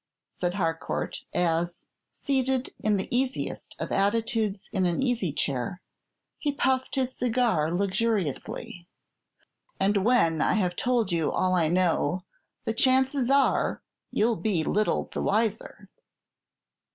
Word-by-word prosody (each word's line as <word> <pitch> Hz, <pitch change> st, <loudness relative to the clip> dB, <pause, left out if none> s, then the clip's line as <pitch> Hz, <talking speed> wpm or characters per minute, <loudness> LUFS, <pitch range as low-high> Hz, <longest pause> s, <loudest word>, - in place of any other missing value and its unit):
said 175 Hz, 0 st, -3 dB
Harcourt, 165 Hz, -4 st, -2 dB
as, 170 Hz, 0 st, 0 dB, 0.2 s
seated 265 Hz, -1 st, -1 dB
in 215 Hz, -1 st, +1 dB
the 190 Hz, -, -3 dB
easiest 260 Hz, +1 st, -2 dB
of -, -, -5 dB
attitudes 210 Hz, 0 st, 0 dB
in 190 Hz, -3 st, +2 dB
an 175 Hz, -, -1 dB
easy 240 Hz, -, 0 dB
chair, 135 Hz, +3 st, -2 dB, 0.6 s
he 295 Hz, -, 0 dB
puffed 260 Hz, -1 st, 0 dB
his 260 Hz, -1 st, -1 dB
cigar 230 Hz, -10 st, +1 dB
luxuriously; 185 Hz, -, -2 dB, 0.9 s
"and 200 Hz, 0 st, +2 dB
when 180 Hz, -10 st, +3 dB
I -, -, +3 dB
have 180 Hz, -5 st, +1 dB
told 240 Hz, -4 st, +1 dB
you 165 Hz, -3 st, +1 dB
all 185 Hz, 0 st, +1 dB
I 170 Hz, -3 st, +3 dB
know, 175 Hz, 0 st, +1 dB, 0.4 s
the 225 Hz, -, 0 dB
chances 260 Hz, +1 st, +2 dB
are 275 Hz, 0 st, +2 dB, 0.3 s
you'll 225 Hz, +1 st, +1 dB
be 195 Hz, -8 st, 0 dB
little 210 Hz, +6 st, +1 dB
the -, -, -5 dB
wiser." 220 Hz, +1 st, -1 dB
205 Hz, 125 wpm, -27 LUFS, 175-245 Hz, 0.9 s, when